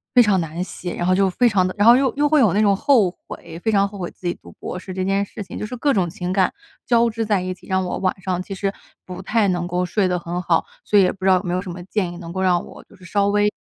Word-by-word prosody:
非 245 - +9
常 205 -4 +2
难 165 +2 -4
写， 180 -1 -6
然 175 - -2
后 185 - +3
就 195 0 +3
非 245 +7 +2
常 190 -4 +2
的 185 - -4
然 205 +2 +4
后 235 - +9
又 265 0 +2
又 295 +1 +2
会 305 0 +4
有 220 -9 +4
那 205 - +2
种 200 -2 +4
后 230 -5 +3 0.2
悔， 165 0 -9
非 220 +5 0
常 200 -1 +3
后 200 0 -10
悔 175 - -3
自 - - -17
己 175 - 0
读 - - -13
博 - - -7
士 185 +1 -8
这 185 0 -2
件 195 +1 +1
事 205 - -8
情， - - -9
就 - - -3
是 245 +4 -6
各 280 +3 +2
种 185 -4 +1
情 180 0 -4
感 190 -1 +2 0.3
交 235 -1 +3
织 225 0 -3
在 205 -3 +1
一 185 0 -3
起， 185 - -18
让 190 0 +1
我 180 - -3
晚 190 0 -1
上 185 -1 -2
其 185 - -7
实 195 +1 -2 0.3
不 180 0 -7
太 215 +2 +1
能 175 -1 -1
够 180 +1 -1
睡 195 +1 +1
得 180 -1 0
很 175 +1 -4
好。 170 -2 +1 0.2
所 210 - +3
以 200 - +7
也 180 - +2
不 190 - -13
知 - - +5
道 190 - +6
有 180 - -4
没 175 -2 -2
有 180 - 0
什 190 - -8
么 175 +1 -8
建 185 -2 -2
议， - - -9
能 170 -1 -8
够 190 - -2
让 180 -2 +2
我 - - -13
就 - - -23
是 185 - -16
稍 200 +2 +1
微， 205 +1 +3
190 Hz, 350 characters per minute, -21 LUFS, 180-210 Hz, 0.3 s, 非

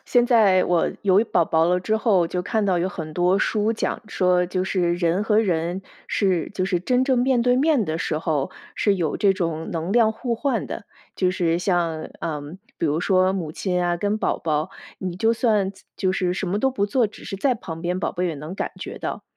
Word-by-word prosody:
现 245 -1 +3
在 210 -7 +4
我 175 -2 +1
有 200 +2 +4
宝 170 - +4
宝 160 0 +2
了 180 +1 +2
之 215 +4 0
后， 195 -7 +2
就 180 +1 -2
看 220 +1 0
到 185 -3 +2
有 180 +2 0
很 160 -5 -6
多 180 +3 +2
书 215 +1 +1
讲 220 - -2
说， 180 -2 +2
就 185 +1 -1
是 175 -3 +1
人 175 +3 +1
和 215 -1 +3
人 175 -1 -1 0.2
是 185 -5 0
就 185 - 0
是 180 -2 0
真 250 +7 +1
正 260 -2 +2
面 250 -1 +2
对 250 0 +3
面 280 -5 +3
的 160 0 -3
时 155 - -1
候， 155 -4 -1 0.3
是 205 -2 +2
有 165 -5 -1
这 200 -2 +3
种 165 -4 -3
能 165 +3 -2
量 225 -2 +4
互 235 +1 -2
换 275 +4 -1
的。 - - -6 0.3
就 185 -1 +2
是 170 -3 0
像， 175 -4 -1
嗯， 150 +2 -5 0.2
比 165 - 0
如 150 +2 +1
说 185 0 +3
母 175 -5 -3
亲 180 -1 -1
啊 175 0 +1
跟 205 +4 0
宝 - - -1
宝， 155 -1 -1 0.3
你 180 -2 -4
就 225 +4 +2
算 215 -5 +1 0.3
就 185 -1 0
是 180 -2 0
什 185 - -3
么 200 +3 0
都 265 +3 +2
不 205 -6 0
做， 235 +2 +2
只 210 - -13
是 195 - -5
在 255 +4 +1
旁 165 -6 -8
边， 180 +1 -1
宝 - - -1
贝 180 +1 -1
也 165 - -2
能 155 +6 -7
感 - - -3
觉 - - -6
到。 - - -5
185 Hz, 240 characters per minute, -23 LUFS, 170-215 Hz, 0.3 s, 在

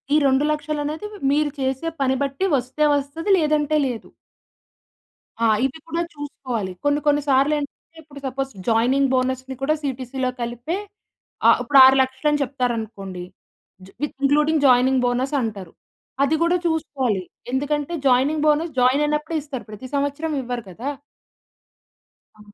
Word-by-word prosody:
ఈ - - +6
2,00,000 295 +2 +1
అనేది 310 +8 -4 0.2
మీరు 295 0 +2
చేసే 265 +4 -1
పని 265 0 +2
బట్టి 280 +7 -1
వస్తే 260 +4 -1
వస్తది 305 +7 -2
లేదంటే 305 -1 +2
లేదు. 240 -3 -6 1.4
ఆ! - - +5 0.2
ఇవి 270 +4 -3
కూడా 335 +1 -1
చూసుకోవాలి. 255 -9 -5
కొన్ని 290 0 +2
కొన్ని 290 0 +4
సార్లు 275 +3 +4
ఏంటంటే, 295 +3 -8
ఇప్పుడు 285 -1 -12
సపోజ్ 270 +1 -3 0.2
జాయినింగ్ 250 +4 +3
బోనస్‌ని 260 +1 -1
కూడా 295 +3 +2
సీటీసీ‌లో 260 -1 -2
కలిపే 240 - -3 0.7
ఆహ్, - - +7
ఇప్పుడు 285 -1 +2
6,00,000 265 +2 +3
అని 295 -1 +1
చెప్తారు 250 -2 -1
అనుకోండి. 195 -5 -6 0.6
జ్ - - -15
విత్ 295 -1 -3
ఇంక్లూడింగ్ 300 +2 +3
జాయినింగ్ 255 +1 +4
బోనస్ 250 +3 0
అంటారు. 200 -6 -5 0.5
అది 295 +3 +2
కూడా 345 +1 +3
చూసుకోవాలి. 270 - -1 0.3
ఎందుకంటే 290 +4 -1
జాయినింగ్ 280 +5 +3
బోనస్ 310 +2 +2
జాయిన్ 255 +4 +4
అయినప్పుడే 300 +2 -1
ఇస్తారు. 275 -4 -7
ప్రతి 215 +5 -8
సంవత్సరం 285 +3 -1
ఇవ్వరు 245 -2 -4
కదా! 235 +10 -5 1.5
ఆ! - - -23
275 Hz, 140 wpm, -22 LUFS, 255-300 Hz, 1.5 s, ఆహ్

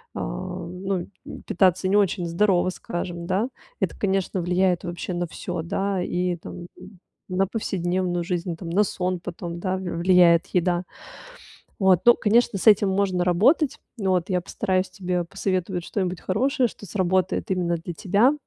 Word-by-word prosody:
а, - - -4
ну, 180 - -4 0.2
м, - - -9
питаться 185 0 +2
не 200 - +2
очень 195 -3 +2
здорово, 185 +1 +2
скажем, 175 -1 -5
да. 190 +6 0 0.3
Это, - - -1
конечно, 195 -2 0
влияет 180 +1 +1
вообще 175 +1 -4
на 175 0 -1
всё, 175 0 -5
да, 195 +2 -1
и 180 0 -1
там, 175 +1 -9
м, 185 - -14 0.3
на 190 +1 +1
повседневную 180 -4 -1
жизнь 175 -1 -3
там, 170 -3 -7
на 205 +4 +4
сон 185 -2 -2
потом, 175 -1 -6
да, 185 0 -1
в - - -6
влияет 175 -1 +4
еда. 180 0 +1 1.0
Вот. 190 -3 +5
Ну, 240 - +9
конечно, 225 -1 +2
с - - -6
этим 205 -1 +6
можно 190 -2 +1
работать, 260 - +3 0.2
вот. 185 -2 0
Я 180 -1 +2
постараюсь 185 +1 -1
тебе 180 -3 -2
посоветовать 185 0 -2
что-нибудь 185 -3 -2
хорошее, 255 +6 +1
что 205 - -12
сработает 185 0 0
именно 175 -2 +1
для 170 +1 -6
тебя. 205 - +3
185 Hz, 160 wpm, -24 LUFS, 175-195 Hz, 1.0 s, Ну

